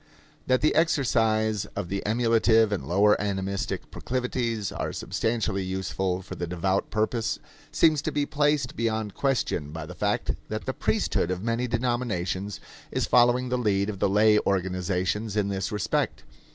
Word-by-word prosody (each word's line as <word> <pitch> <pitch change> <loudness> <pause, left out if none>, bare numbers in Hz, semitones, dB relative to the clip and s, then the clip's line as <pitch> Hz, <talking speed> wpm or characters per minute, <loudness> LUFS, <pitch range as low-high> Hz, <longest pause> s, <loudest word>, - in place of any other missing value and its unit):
That 130 0 +3
the 155 - +3
exercise 110 - +2
of 100 -3 -3
the 100 +2 -3
emulative 115 -1 +3
and 100 - -2
lower 100 +4 +4
animistic 100 -1 -3
proclivities 120 -4 -2
are - - -3
substantially 110 -4 -1
useful 95 0 -2
for 95 - -8
the 85 - -4
devout 95 +3 0
purpose 110 +1 0 0.3
seems 155 -3 +4
to 155 - -2
be 145 0 0
placed 145 -3 +1
beyond 110 -3 -1
question 125 - 0
by 80 0 -6
the - - -9
fact - - 0 0.2
that - - -4
the - - -2
priesthood 85 - 0
of 95 +1 -3
many 115 +2 0
denominations 115 -6 -2 0.3
is - - 0
following 125 +1 +4
the 125 0 0
lead 100 -3 +1
of 100 - -9
the 100 - +2
lay 105 +1 +5
organizations 95 +2 -1
in 105 -1 +1
this 95 -1 -2
respect. 105 -2 -1
105 Hz, 155 wpm, -26 LUFS, 95-120 Hz, 0.3 s, lay